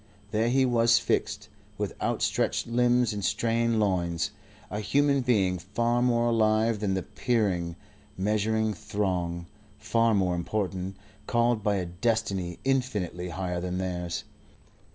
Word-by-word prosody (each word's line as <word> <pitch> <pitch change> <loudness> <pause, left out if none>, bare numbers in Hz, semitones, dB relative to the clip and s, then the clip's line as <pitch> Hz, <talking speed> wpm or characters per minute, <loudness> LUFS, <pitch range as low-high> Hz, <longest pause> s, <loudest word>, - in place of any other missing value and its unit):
There 110 +2 +1
he 130 +1 +3
was 115 -1 +4
fixed, 105 -1 -1 0.3
with 105 -1 -2
outstretched - - 0
limbs 120 -1 +2
and 100 -1 -4
strained 115 +4 +1
loins, 90 -4 0 0.4
a 105 - -2
human 140 +5 +2
being 100 -8 +2
far 115 +6 0
more 120 -1 +2
alive 110 -1 +2
than 100 -2 0
the 95 - -2
peering, 95 -8 -1 0.4
measuring 110 +2 +1
throng, 90 -5 -2 0.3
far 115 +1 +2
more 95 -3 +2
important, 95 +1 -2 0.3
called 120 -1 +2
by 105 -1 +1
a 95 -2 -1
destiny 95 -1 -1
infinitely 105 -10 -1
higher 90 -1 -3
than 90 0 -3
theirs. 90 -2 -3
105 Hz, 130 wpm, -27 LUFS, 90-115 Hz, 0.4 s, was